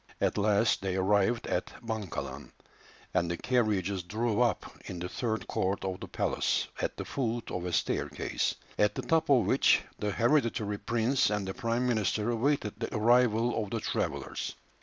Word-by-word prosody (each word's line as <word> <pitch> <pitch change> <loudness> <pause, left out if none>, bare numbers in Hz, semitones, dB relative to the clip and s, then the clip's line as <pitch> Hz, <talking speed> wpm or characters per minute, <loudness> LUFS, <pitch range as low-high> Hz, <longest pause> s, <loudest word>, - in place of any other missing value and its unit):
At - - +1
last 105 +2 +3
they 95 -1 -1
arrived 100 +4 +2
at - - -1 0.2
Bankalan, 110 -5 -4 0.6
and 85 - +1
the 85 - -2
carriages 100 -6 +1
drew 110 +5 -1
up 120 -3 +2 0.2
in 90 - -6
the 90 +1 -4
third 110 -1 -2
court 95 +1 -1
of 95 -1 -3
the - - -7
palace - - 0
at - - -2
the - - -4
foot 120 -3 -2
of 90 -1 -3
a 90 - -2
staircase, - - -1 0.2
at 105 0 +3
the - - -3
top 160 -2 +2
of 125 -7 +5
which - - +4 0.2
the 105 - -1
hereditary 115 -3 +1
prince 120 +3 +2
and 105 -2 -1
the 95 - -3
prime 115 +3 -1
minister 110 -1 +1
awaited 115 -3 0
the 115 - -3
arrival 115 0 +3
of 105 - -7
the 115 - -2
travellers. - - -3
110 Hz, 170 wpm, -30 LUFS, 100-120 Hz, 0.6 s, of